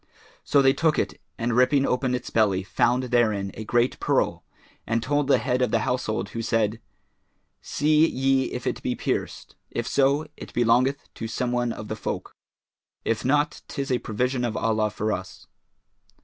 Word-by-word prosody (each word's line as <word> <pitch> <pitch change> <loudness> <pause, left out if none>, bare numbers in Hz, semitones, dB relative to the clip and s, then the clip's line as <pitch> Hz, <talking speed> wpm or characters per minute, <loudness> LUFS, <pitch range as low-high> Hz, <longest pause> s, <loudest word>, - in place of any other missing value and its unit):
So 140 -1 +3
they 135 0 +5
took 155 +1 +1
it - - -2 0.2
and 115 0 -1
ripping 135 +2 +4
open 125 -1 0
its 125 - -5
belly, 100 -4 +2
found 125 +6 +1
therein 110 -6 +1
a 110 - -7
great 120 +3 +1
pearl - - 0 0.4
and 115 0 0
told 145 0 +1
the 140 - +5
head 125 -1 0
of 125 - +2
the 115 0 +1
household 110 -5 -1
who 115 - -4
said, 115 -1 0 0.8
"See 155 +2 +3
ye 135 0 +2
if - - -5
it - - -2
be - - -1
pierced: - - -3
if 120 - -3
so, 140 +3 +2
it - - -10
belongeth 125 +4 +2
to 115 - -5
some 120 +2 -2
one 120 -1 0
of 110 - -7
the 110 - -3
folk; - - -5 0.7
if 115 -2 0
not, 145 +3 +1
'tis 140 -1 -4
a 125 - +2
provision 125 +4 -1
of 120 -2 -1
Allah 110 -1 +1
for 110 +1 -2
us." 95 0 -7
120 Hz, 175 wpm, -25 LUFS, 110-135 Hz, 0.8 s, they